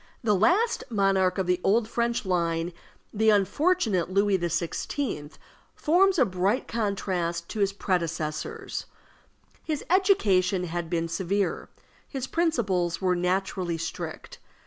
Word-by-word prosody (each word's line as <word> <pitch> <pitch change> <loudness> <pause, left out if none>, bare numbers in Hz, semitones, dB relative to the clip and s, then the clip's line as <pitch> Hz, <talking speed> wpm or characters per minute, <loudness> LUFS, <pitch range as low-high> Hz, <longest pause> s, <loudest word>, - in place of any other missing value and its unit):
The 215 -2 +3
last 365 - +2
monarch 195 -4 +2
of 190 - 0
the 180 0 +1
old 215 +3 +3
French 235 -1 -1
line, 170 -2 0 0.4
the 220 +1 +3
unfortunate 210 - +2
Louis 200 0 +2
XVI., 170 - -2 0.4
forms 370 +4 +3
a 260 - +5
bright 190 +4 0
contrast 185 -6 -2
to 220 - -5
his 200 -1 +2
predecessors. 165 -5 -3 0.8
His 305 -3 -3
education 200 - +3
had 170 -1 -4
been 165 -1 -1
severe, 190 +4 -1 0.4
his 265 -3 -4
principles 210 - 0
were 185 -1 +1
naturally 180 -1 -1
strict. 165 0 -6
190 Hz, 120 wpm, -26 LUFS, 175-230 Hz, 0.8 s, a